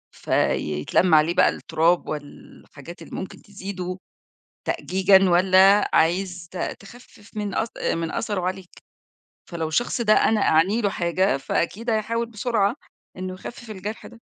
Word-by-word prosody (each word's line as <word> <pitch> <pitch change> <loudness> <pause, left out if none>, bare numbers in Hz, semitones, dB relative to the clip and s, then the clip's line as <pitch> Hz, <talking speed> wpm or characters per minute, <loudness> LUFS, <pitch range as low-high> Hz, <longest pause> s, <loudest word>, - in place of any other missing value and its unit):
فيتلم 75 - +1
عليه 155 +3 +4
بقى - - +5
التراب 165 +2 0
وال 145 -2 -8
حاجات 155 +5 -11
اللي - - -9
ممكن 190 - -7
تزيده 190 -2 -6 0.7
تأجيجًا، 190 0 +3
والّا 190 +3 +5
عايز 175 +1 +1
ت 185 - -8 0.2
تخفف 210 0 -16
من 205 -2 -3
أث 225 - -1
آآ، - - -1
من 165 -1 -3
أثره 205 -4 -2
عليك؟ 185 0 -4 0.8
فلو 165 -2 -3
الشخص 240 +9 -1
ده 215 -2 +4
أنا 215 -1 +3
أعني 190 +9 +3
له 205 - +1
حاجة 175 -3 0
فأكيد 190 - -2
هيحاول 230 +1 0
بسرعة 225 -1 0 0.4
إنه 185 0 -5
يخفف 235 +5 -10
الجرح 210 +2 -7
ده. 235 - -15
190 Hz, 140 wpm, -23 LUFS, 170-210 Hz, 0.8 s, بقى